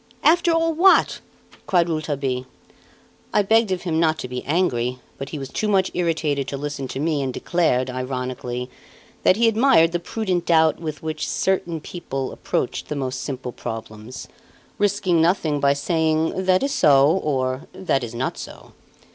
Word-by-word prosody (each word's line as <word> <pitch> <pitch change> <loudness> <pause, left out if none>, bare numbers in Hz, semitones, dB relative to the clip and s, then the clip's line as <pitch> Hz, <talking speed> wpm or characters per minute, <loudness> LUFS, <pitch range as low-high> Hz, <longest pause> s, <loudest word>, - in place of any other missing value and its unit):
After 345 +2 +4
all 330 0 +2
what?" 370 +4 +4 0.5
cried 175 -3 +3
Rouletabille. 140 -5 -2 0.9
I 210 - +5
begged 220 0 +3
of 185 -1 -2
him 165 -3 0
not 160 -1 +2
to 125 - -5
be 125 0 -5
angry; 125 -7 0 0.2
but 135 - -5
he 155 - -5
was 135 -2 -6
too 215 - -2
much 195 -2 +2
irritated 160 -5 0
to 140 - -4
listen 145 -1 -4
to 130 - -5
me 150 -1 0
and 135 -1 -2
declared, 130 -4 0
ironically, 125 -1 -4 0.5
that - - +4
he 230 +2 +3
admired 225 -7 +4
the 175 - -1
prudent 185 -1 -2
doubt 160 -2 +4
with 155 -2 -6
which 155 -1 -3
certain 175 -4 0
people 135 -6 -5
approached - - -3
the 150 - -2
most 130 -2 -3
simple 130 -3 -5
problems, 110 0 -7 0.5
risking 195 -4 +2
nothing 165 -4 +1
by 140 0 +3
saying 160 +4 0
"that 185 +3 +3
is 275 - 0
so, 140 -1 +5 0.2
or 130 -2 -1
'that 140 -8 -1
is 120 0 -6
not 125 +3 -3
so." - - -10
155 Hz, 165 wpm, -22 LUFS, 130-180 Hz, 0.9 s, I